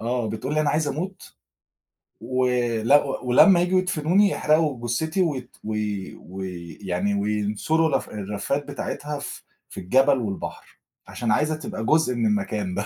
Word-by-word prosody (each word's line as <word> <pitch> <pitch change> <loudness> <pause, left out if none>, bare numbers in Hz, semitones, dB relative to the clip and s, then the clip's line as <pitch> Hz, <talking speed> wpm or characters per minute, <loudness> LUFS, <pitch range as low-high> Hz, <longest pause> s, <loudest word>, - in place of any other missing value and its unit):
آه، 120 -1 -1
بتقول 130 +6 -3
لي: 155 - +2
"أنا 145 -2 +2
عايزة 150 -1 +1
أموت، 180 +6 -6 0.9
و 130 +2 0 0.4
ل 120 - +3 0.3
ولمّا 170 +9 +6
ييجوا 180 +1 +3
يدفنوني 185 +3 +2
يحرقوا 150 -9 +1
جثتي 160 +10 0
وت" 135 -8 -2
وي 105 -3 -3
وي 90 -3 -8
ويعني 95 +2 -1
وينثروا 105 +10 +1
الرف 135 -3 -1
الرفات 105 +8 -3
بتاعتها 145 +1 -4
ف 140 - -7 0.3
في - - -8
الجبل 135 +8 +3
والبحر. 105 -5 -6 0.3
عشان 115 -3 -2
عايزة 150 +7 +2
تبقى 140 -7 -6
جزء 155 -2 +3
من 115 - 0
المكان 105 -2 -1
ده. 100 +2 -2
125 Hz, 150 wpm, -24 LUFS, 105-155 Hz, 0.9 s, ولمّا